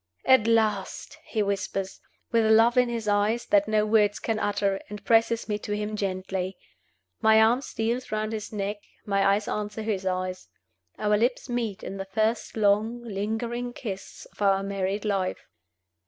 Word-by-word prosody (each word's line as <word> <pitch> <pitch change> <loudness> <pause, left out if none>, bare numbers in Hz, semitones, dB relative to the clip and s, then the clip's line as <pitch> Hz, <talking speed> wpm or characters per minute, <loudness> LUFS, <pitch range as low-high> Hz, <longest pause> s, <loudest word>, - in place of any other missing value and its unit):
"At 260 -4 +5
last!" 215 -4 0
he 215 - -1
whispers, 195 -1 -3 0.3
with 225 -2 +3
love 225 +2 +5
in 250 -1 +4
his 230 -2 -3
eyes 210 +3 +1
that 305 0 +3
no 215 -1 +2
words 210 -1 +3
can 225 -2 -2
utter, 200 -2 0
and 210 -1 -8
presses 230 0 +3
me 210 -1 -1
to 210 0 -3
him 210 +1 -3
gently. 190 -1 -3 0.6
My 220 -1 +6
arm 230 +4 +4
steals 235 -1 -3
round 215 0 -1
his 215 -1 -5
neck; 205 0 -3 0.3
my 200 -1 +1
eyes 200 +2 +2
answer 210 +1 -3
his 200 -3 -2
eyes. 185 0 -3 0.5
Our 210 0 +2
lips 245 +3 0
meet 230 -5 -2
in 195 - -6
the 195 - -4
first 215 +4 -1
long, 215 +3 +2
lingering 230 +3 -3
kiss 195 -7 -7
of - - -17
our 195 -1 +3
married 195 +1 -2
life. 195 -3 -1
210 Hz, 165 wpm, -26 LUFS, 200-225 Hz, 0.6 s, My